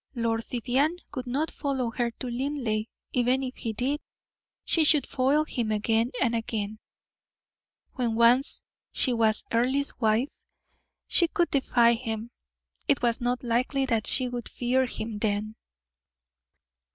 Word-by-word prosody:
Lord 230 -1 -1
Vivianne 260 +8 0 0.2
would 255 -2 -5
not 285 +6 -1
follow 265 -5 -2
her 240 +1 -1
to 235 - -8
Linleigh; 245 -4 -2 0.3
even 250 +2 +2
if 255 -1 -5
he 225 - -3
did, 265 +7 -2 0.6
she 325 - +4
could 300 -1 +5
foil 280 +4 +1
him 235 -7 -2
again 225 +2 +1
and 235 -2 +1
again. 215 -2 -3 1.1
When 240 -3 -1
once 240 +4 +4 0.3
she 255 - +2
was 220 -2 +3
Earle's 260 +5 +1
wife, 225 +4 0 0.7
she 340 - +4
could 345 0 0
defy 240 -4 +3
him; 225 -1 -4 0.6
it 275 -3 +2
was 235 -1 +1
not 245 +1 -1
likely 255 +3 0
that 225 -4 0
she 255 -2 +4
would 245 -1 -5
fear 255 +1 0
him 220 -3 -5
then. 215 0 -1
245 Hz, 140 wpm, -27 LUFS, 225-265 Hz, 1.1 s, could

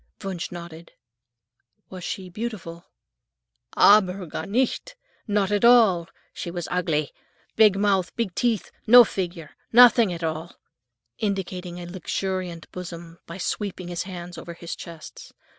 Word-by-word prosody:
Wunsch 185 -3 -4
nodded. 170 -1 -10 1.0
"Was 185 -1 -8
she 185 +2 -5
beautiful?" 180 -4 -6 0.9
"Aber 195 -2 +5
gar 160 0 -6
nicht! 260 - -1 0.3
Not 205 -2 +1
at 205 +1 +1
all. 220 -8 +5 0.2
She - - -6
was 175 -1 -5
ugly; 160 -5 0 0.4
big 215 -3 +6
mouth, 195 -3 +1
big 225 -6 -2
teeth, 230 -2 -1 0.2
no 245 +2 +10
figure, 175 -7 -5 0.2
nothing 235 -3 +7
at 170 -1 -5
all," 160 +1 -4 0.6
indicating 185 -3 -3
a 175 - -7
luxuriant 185 -1 -4
bosom 170 -2 -9
by 170 - -8
sweeping 190 -1 -4
his 175 0 -3
hands 175 -2 -7
over 170 - -9
his 170 0 -7
chest. 165 -2 -11
180 Hz, 130 wpm, -24 LUFS, 170-205 Hz, 1.0 s, no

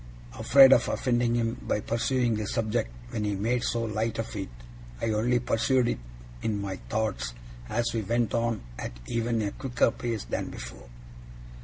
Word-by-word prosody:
Afraid 135 -1 +8
of - - +3
offending 120 -2 +1
him 115 0 0
by - - 0
pursuing 120 +2 +1
the 105 -1 -2
subject 110 - 0 0.2
when 105 - -2
he 105 -1 0
made 120 +5 0
so 115 0 0
light 110 0 -1
of 115 0 -4
it, 95 -2 -4 0.5
I 115 - 0
only 115 +3 +2
pursued 120 +1 +2
it - - -2 0.4
in 105 -2 -1
my 95 -2 -3
thoughts 105 - -1 0.3
as 120 +1 0
we 115 - 0
went 115 +2 0
on 115 -1 0 0.2
at - - -6
even 115 -1 0
a 100 - -1
quicker 125 -3 +1
pace 115 -4 -3
than - - -3
before. 60 -1 -9
115 Hz, 170 wpm, -28 LUFS, 105-120 Hz, 0.5 s, Afraid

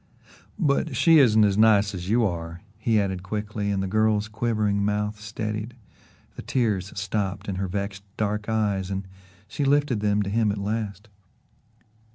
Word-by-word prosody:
"But 150 -4 +1
she 165 +3 +6
isn't 110 -5 +5
as 100 0 +2
nice 105 -2 +5
as 90 0 -5
you 115 +1 +3
are," 85 -1 -4 0.2
he 110 0 +2
added 95 -2 -1
quickly, 105 +2 -3
and 100 -1 0
the - - -2
girl's 110 +1 +2
quivering 110 -2 0
mouth 105 +1 -1
steadied, 105 +2 -4 0.6
the - - -7
tears 105 -7 -1
stopped 100 -1 -2
in 95 -2 -3
her 95 0 -1
vexed 100 +1 -4 0.2
dark 105 0 -2
eyes 100 -4 0
and 95 0 -4 0.4
she 145 - -3
lifted 140 -4 +2
them 105 0 +1
to 100 - -4
him 110 -1 +2
at 100 - -4
last. 105 0 -3
105 Hz, 165 wpm, -25 LUFS, 100-110 Hz, 0.6 s, she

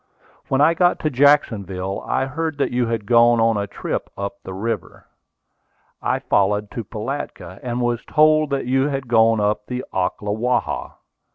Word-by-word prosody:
When 135 +1 +1
I 160 +3 +5
got 175 +1 +3
to 155 - 0
Jacksonville, 100 -9 +2
I - - 0
heard 155 +2 -3
that 140 - 0
you 120 -1 0
had 115 -2 -2
gone 120 +1 +5
on 115 0 +3
a 100 0 -2
trip - - -4
up 100 0 -5
the - - -9
river. 100 -2 -4 1.0
I - - 0
followed 105 +1 0
to 115 - -5
Pilatka, 105 -5 -6
and 125 0 -3
was 120 -1 -1
told 155 0 +4
that 140 -2 -1
you 130 +2 +2
had 135 -2 -3
gone 115 -1 +4
up 105 0 0
the 125 0 -4
Ocklawaha. 105 +6 -1
120 Hz, 165 wpm, -21 LUFS, 105-135 Hz, 1.0 s, I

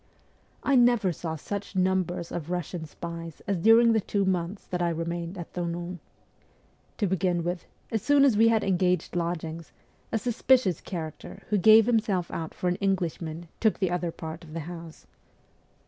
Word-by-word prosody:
I 280 - +2
never 240 -6 +4
saw 160 0 -4
such 200 +6 -6
numbers 185 -2 0
of 160 -3 -4
Eussian 175 -2 -4
spies 165 0 -8
as 195 -1 0
during 225 +4 +6
the 220 - +2
two 200 0 0
months 185 +1 -1
that 180 -1 -3
I 175 - +2
remained 170 +2 -3
at 175 - -8
Thonon. 175 0 -4 1.0
To 210 - +1
begin 180 -2 0
with, 175 0 -3 0.2
as 220 -2 0
soon 285 -1 +5
as 260 -6 +4
we 225 +2 +5
had 225 -1 +3
engaged 180 -2 +1
lodgings, 170 -1 -3 0.4
a - - +1
suspicious 240 - +2
character, 160 -4 -7
who 210 - +2
gave 220 +3 +7
himself 210 -7 +1
out 160 -1 -5
for 180 - -2
an 180 0 +1
Englishman, 175 -4 -2
took 220 -2 +2
the 185 -3 0
other 175 -1 -1
part 160 +1 -7
of 155 -2 -12
the 165 - -3
house. 165 0 -9
180 Hz, 170 wpm, -27 LUFS, 170-205 Hz, 1.0 s, gave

